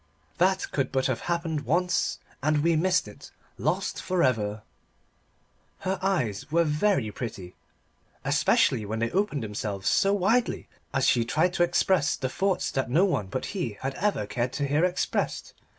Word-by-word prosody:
"That 190 +1 +2
could 135 -2 -1
but 130 -1 0
have 130 -3 0
happened 170 -3 -1
once 175 +7 +1 0.2
And 150 +1 +2
we 170 0 +3
missed 180 -5 +2
it, 105 - -12 0.3
lost 155 - -1
it - - -5
for 185 -2 0
ever!" 105 -4 0 1.2
Her 190 0 -1
eyes 145 - -1
were 170 +1 +4
very 150 - +1
pretty, 100 -6 -6 0.7
especially 110 - +3
when 105 +2 -3
they 115 +1 -1
opened 185 - 0
themselves 105 -2 -4
so 195 -1 +3
widely 205 +5 +1 0.2
as 135 -1 +1
she 120 - +4
tried 160 +9 +1
to 175 - +3
express 175 -3 +2
the 130 - -3
thoughts 190 +6 0
that 135 -3 -1
no 170 +10 +4
one 105 - -1
but 125 +7 -3
he 120 - -3
had 135 +1 -2
ever 200 - 0
cared 120 +4 -2
to 140 +1 -1
hear 145 +4 +2
expressed. 180 0 -1
150 Hz, 165 wpm, -27 LUFS, 120-180 Hz, 1.2 s, were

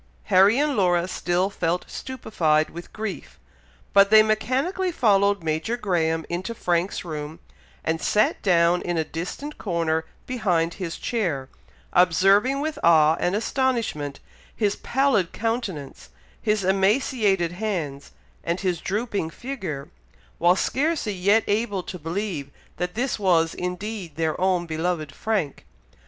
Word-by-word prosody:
Harry 195 +5 +6
and 290 0 +1
Laura 180 -4 +2
still 185 +1 0
felt 175 -1 -1
stupified 165 -12 0
with 170 +1 -9
grief, 215 -3 -6 0.6
but 200 0 +6
they 215 0 +8
mechanically 265 - 0
followed 200 - +3
Major 160 +9 -1
Graham 165 -7 0
into 185 +7 -4
Frank's 175 -1 -1
room, 155 -1 -6 0.4
and 160 0 -1
sat 210 +1 +2
down 175 -2 +3
in 175 -1 -2
a 160 - +2
distant 180 - -6
corner 165 -4 -1 0.2
behind 180 -9 0
his 180 -4 -5
chair, 165 - -2 0.4
observing 195 +9 +4
with 310 0 -3
awe 160 -2 +6
and 180 +2 0
astonishment 225 - -1 0.4
his 205 -2 +1
pallid 250 -9 +1
countenance, 215 - -4 0.3
his 210 -2 +1
emaciated 195 - +2
hands, 175 -8 -4 0.3
and 170 +2 -2
his 180 -3 -1
drooping 205 -4 -2
figure, 180 - -6 0.5
while 175 +2 +5
scarcely 285 - 0
yet 200 +4 +3
able 205 -3 0
to 180 - -7
believe 165 -3 -3 0.3
that 180 0 -3
this 245 0 -1
was 170 -5 +3
indeed 180 -1 -5
their 160 0 0
own 185 -2 +2
beloved 160 -2 -2
Frank. 205 -11 -2
185 Hz, 130 wpm, -24 LUFS, 165-220 Hz, 0.6 s, they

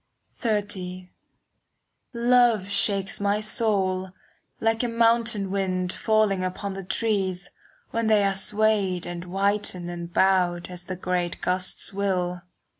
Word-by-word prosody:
XXX 190 -5 -3 1.0
Love 235 -4 +3
shakes 200 -1 +1
my 200 +1 +1
soul, 200 -4 0 0.5
like 225 0 +1
a 245 - 0
mountain 230 -3 +2
wind 185 -2 -1
Falling 215 -4 +2
upon 190 +2 -3
the 195 0 -6
trees, 190 -2 -1 0.4
When 230 -1 0
they 215 -2 +4
are 195 0 +2
swayed 200 -2 +1
and 175 0 -5
whitened 195 -1 -1
and 170 0 -6
bowed 180 -2 +2
As 180 0 -7
the 185 - -4
great 180 -1 -2
gusts 185 +2 -1
will. 180 -3 -1
195 Hz, 120 wpm, -25 LUFS, 180-215 Hz, 1.0 s, they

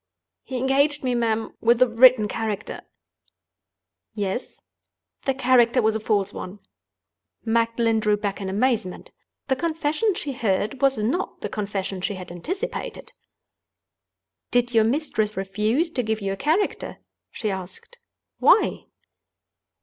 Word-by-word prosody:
"He 260 - -5
engaged 275 +3 +2
me, 255 -1 0
ma'am, 225 -2 0
with 235 +1 +4
a 255 - +6
written 235 -1 +6
character—" 210 -1 -4 1.3
"Yes?" 205 +3 -3 0.7
"The 270 - +1
character 250 -1 +4
was 220 -2 +3
a 220 - -1
false 210 -3 0
one." 185 +3 -7 0.9
Magdalen 230 0 +2
drew 210 -1 +2
back 205 0 -3
in 190 - -3
amazement. 215 -2 -1 0.4
The 265 - +2
confession 325 +6 0
she 290 - -4
heard 215 0 -1
was 275 -1 +3
not 245 - -2
the - - -3
confession 195 -2 -3
she 200 - -2
had 185 -1 -8
anticipated. 375 - -5 1.4
"Did 245 0 +1
your 225 -1 +5
mistress 225 -5 -1
refuse 215 - 0
to 260 - -1
give 220 -2 -1
you 195 -2 -2
a - - -3
character?" 315 - -1 0.3
she 215 -3 -3
asked. 190 - -8 0.4
"Why?" - - +4
230 Hz, 130 wpm, -24 LUFS, 210-265 Hz, 1.4 s, a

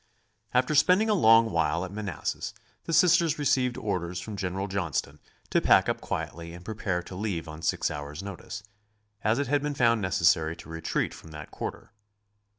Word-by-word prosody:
After 125 +4 +2
spending 185 +8 +4
a - - +5
long 115 - +6
while 85 +1 +1
at 90 - -9
Manassas 100 -3 -4 0.3
the - - -4
Sisters 170 -1 +4
received 130 -4 +1
orders 90 -4 -2
from 105 +4 -6
General 95 0 -3
Johnston 80 -6 -2 0.3
to - - +3
pack - - +5
up - - -1
quietly 85 0 -5
and 90 +1 -12
prepare 100 -5 -2
to 95 - -10
leave 90 -4 -3
on 80 0 -8
six - - 0
hours' 75 +3 -6
notice, 100 +3 -7 0.6
as 110 +3 +2
it 140 - 0
had 145 +2 +1
been 145 0 -2
found 115 -3 +3
necessary 85 -3 +2
to 85 - -13
retreat 80 0 -2
from 80 - -12
that 75 0 -9
quarter. - - -6
100 Hz, 175 wpm, -28 LUFS, 85-125 Hz, 0.6 s, long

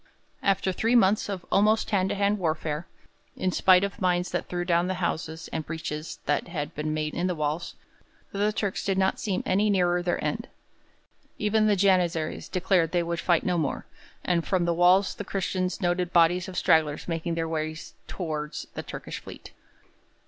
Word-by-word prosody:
After 195 -1 +1
three 225 +6 +1
months 205 -2 +4
of 190 -3 -4
almost 215 +2 +3
hand 190 -2 +2
to - - -1
hand 200 +1 +1
warfare, 160 -2 -2 0.5
in 185 - 0
spite 185 +1 +5
of 200 +2 -4
mines 180 -1 +1
that - - -2
threw 175 0 -3
down 175 0 +2
the 185 - -1
houses 160 -2 -3
and 160 - -2
breaches 155 -1 -5
that 145 - 0
had 155 -4 -4
been 150 +1 -3
made 155 0 -2
in 175 +1 -1
the 180 - -1
walls, 155 +2 -2 0.6
the 205 +1 +1
Turks 205 -2 -2
did 195 -1 0
not 190 0 +1
seem 195 -4 -2
any 205 +3 +2
nearer 180 -3 +2
their 175 0 -1
end. - - -2 0.9
Even 215 +1 +2
the 210 - +4
Janizaries 180 -5 +1
declared 180 -3 +1
they 175 -1 +2
would 170 0 -3
fight 170 -3 +2
no 180 -2 +1
more, 140 -5 -2 0.4
and 175 -2 +1
from 185 -3 +1
the 170 - +1
walls 180 +3 +4
the - - -6
Christians 185 -1 -2
noted 175 0 0
bodies 175 +1 +4
of 185 - -7
stragglers 155 -2 +2
making 165 0 -2
their 165 -1 -1
way 155 -1 -2 0.3
towards 155 -4 -4
the - - -4
Turkish - - -7
fleet. - - -11
180 Hz, 185 wpm, -27 LUFS, 165-190 Hz, 0.9 s, spite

